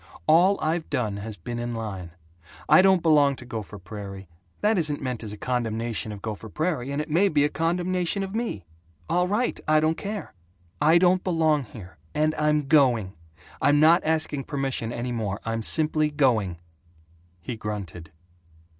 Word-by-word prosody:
All 180 +6 +5
I've 160 +1 -1
done 105 -5 -1
has 105 +1 -7
been 120 +8 -6
in 120 0 -3
line. 100 -6 -5 0.6
I - - +7
don't 190 -2 +4
belong 145 -4 +4
to 120 - -12
Gopher 110 -3 -6
Prairie. 100 0 -8 0.3
That 210 -1 +3
isn't 150 -3 -1
meant 125 -3 -4
as 105 - -6
a 105 - -7
condemnation 115 -2 -2
of 100 -2 -9
Gopher 110 0 -6
Prairie, 155 - -2
and 140 +1 -2
it 150 - -3
may 175 +6 +3
be 145 -3 +3
a - - +1
condemnation 180 +4 -1
of 195 0 -6
me. 220 - -3 0.5
All 180 +1 +2
right! 215 +6 0
I 155 0 +5
don't 155 +1 +1
care! 205 0 -5 0.5
I 160 +3 +6
don't 180 +1 +3
belong 160 -5 +1
here, 100 -5 -12 0.2
and 155 +1 +2
I'm 150 -1 +1
going. 125 -10 +3 0.5
I'm 145 0 +4
not 165 +4 +5
asking 155 -3 0
permission 135 -5 -2
any 120 +1 -4
more. 110 -4 -3
I'm 115 0 -2
simply 155 +4 +2
going." 120 - +1 0.8
He 100 +8 -6
grunted. 100 -7 -6
140 Hz, 170 wpm, -25 LUFS, 110-160 Hz, 0.8 s, I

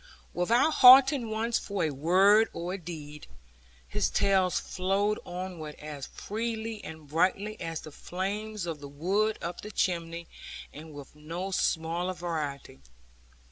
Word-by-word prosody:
Without 230 - +3
halting 260 -2 +8
once 225 +2 0
for 200 -3 -3
a 155 - +1
word 190 +9 +4
or 175 +2 -4
a - - -3
deed, 150 -3 -9 0.6
his 75 - 0
tales 190 -2 +2
flowed 195 +3 0
onward 175 -4 -6
as 150 -2 -7
freely 225 0 -4
and 160 -2 -9
brightly 190 +7 0
as 165 -2 -4
the 155 - -10
flames 200 +5 -4
of 165 -3 -4
the 140 -1 -9
wood 195 +9 0
up 170 +1 -4
the 210 - -8
chimney, 170 -4 -2 0.5
and 155 +1 -10
with 145 0 -11
no 165 +6 -5
smaller 175 +1 0
variety. 150 - -4
180 Hz, 140 wpm, -29 LUFS, 160-210 Hz, 0.6 s, halting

